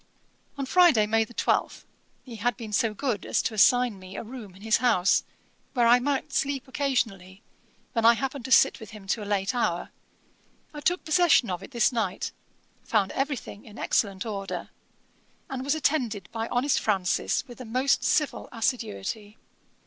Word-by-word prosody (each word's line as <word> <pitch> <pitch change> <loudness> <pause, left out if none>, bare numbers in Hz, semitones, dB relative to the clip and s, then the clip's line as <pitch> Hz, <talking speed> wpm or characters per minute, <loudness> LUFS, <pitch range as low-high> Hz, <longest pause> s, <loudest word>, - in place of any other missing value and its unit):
On 275 - -2
Friday, 320 -8 +5
May 225 +1 +2
12, 240 +1 0
as - - -18 0.4
he 240 -4 -10
had 235 0 0
been 220 -3 -8
so 225 +1 +2
good 225 0 -2
as - - 0
to - - -2
assign 245 0 +4
me 185 +1 -11
a - - -4
room 220 -5 -10
in 195 - -15
his 220 -1 +3
house, 220 -6 +3 0.5
where 240 -2 +3
I 240 +1 +6
might 275 +1 -2
sleep 275 -2 -1
occasionally, 225 -8 -2 0.5
when 230 - 0
I 230 +1 +7
happened 270 -1 -4
to 260 - -6
sit - - +5
with 220 - -10
him 200 - -14
to 220 - 0
a 205 - -7
late 200 +3 0
hour, 205 -8 -1 0.8
I 295 - -7
took 355 +5 0
possession 310 - +4
of 180 - -3
it - - -10
this 240 -3 +2
night, 235 -2 -2 0.5
found 205 -4 +1
every 275 0 -1
thing 205 - -10
in 215 -1 -14
excellent 195 -2 0
order, 200 -3 -5 0.8
and 260 -1 -3
was 285 +3 +1
attended 245 - -1
by 225 0 -3
honest 255 +4 +1
Francis 195 +5 0
with 245 0 -11
a - - -7
most 255 +5 +1
civil 300 -2 0
assiduity. 215 - -3
230 Hz, 180 wpm, -26 LUFS, 205-265 Hz, 0.8 s, I